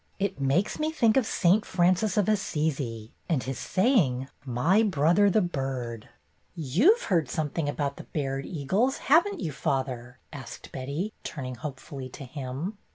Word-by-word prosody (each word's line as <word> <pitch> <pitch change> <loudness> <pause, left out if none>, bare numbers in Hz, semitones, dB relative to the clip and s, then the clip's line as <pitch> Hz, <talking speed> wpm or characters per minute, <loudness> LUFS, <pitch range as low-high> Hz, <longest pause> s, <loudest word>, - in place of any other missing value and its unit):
It 195 -6 -2
makes 140 +9 +1
me 305 +1 +1
think 235 -9 +3
of 260 -4 +3
St. 195 +4 +3
Francis 185 +3 +2
of 205 - +3
Assisi 150 - -1 0.2
and 155 -7 +1
his 135 0 -4
saying, 165 - +2
'My 140 - +2
brother, 185 0 +4
the 205 +1 +3
bird.'" 130 -8 -4 0.5
"You've 190 - +3
heard 165 - +1
something 150 +2 -1
about 145 -1 -2
the - - -9
Baird 135 -2 -3
eagles, 190 - 0
have 335 +6 +7
n't 400 -5 -5
you, 160 - -2
father? 130 -2 -2
" - - -21
asked 140 -2 -9
Betty, 145 +11 -4
turning 130 -4 -5
hopefully 135 0 -7
to 140 - -9
him. 140 - -5
155 Hz, 160 wpm, -27 LUFS, 135-200 Hz, 0.5 s, have